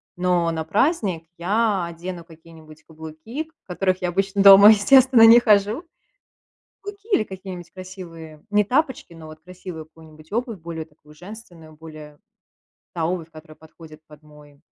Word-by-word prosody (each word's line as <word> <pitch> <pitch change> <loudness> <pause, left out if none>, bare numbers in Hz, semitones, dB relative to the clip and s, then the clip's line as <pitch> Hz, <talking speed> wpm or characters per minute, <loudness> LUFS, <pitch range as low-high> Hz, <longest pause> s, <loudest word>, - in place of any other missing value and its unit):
но 180 -2 0
на 160 -1 -4
праздник 200 - -1
я 200 +1 -1
одену 170 +1 -8
какие-нибудь 160 -1 -17
каблуки, 160 - -9
в - - -51
которых 185 0 -2
я 180 - -2
обычно 195 +2 -1
дома, 200 +1 +9
естественно, 245 +3 +5
не 230 +2 +8
хожу. 210 - +1 1.0
Каблуки 405 +1 -11
или 220 - +3
какие-нибудь 185 -3 -10
красивые 170 -5 -12
не 210 0 +2
тапочки, 265 - -2
но 160 -1 -13
вот 155 0 -13
красивую 180 -1 -11
какую-нибудь 155 -1 -19
обувь 230 -2 -4
более 165 -1 -8
такую, 150 -1 -22
женственную, 175 -3 -14
более 155 -1 -13 0.8
та 165 -2 -2
обувь, 170 -2 -5
которая 155 -1 -15
подходит 160 -1 -16
под 150 0 -18
мой 150 -1 -19
175 Hz, 145 wpm, -21 LUFS, 160-205 Hz, 1.0 s, дома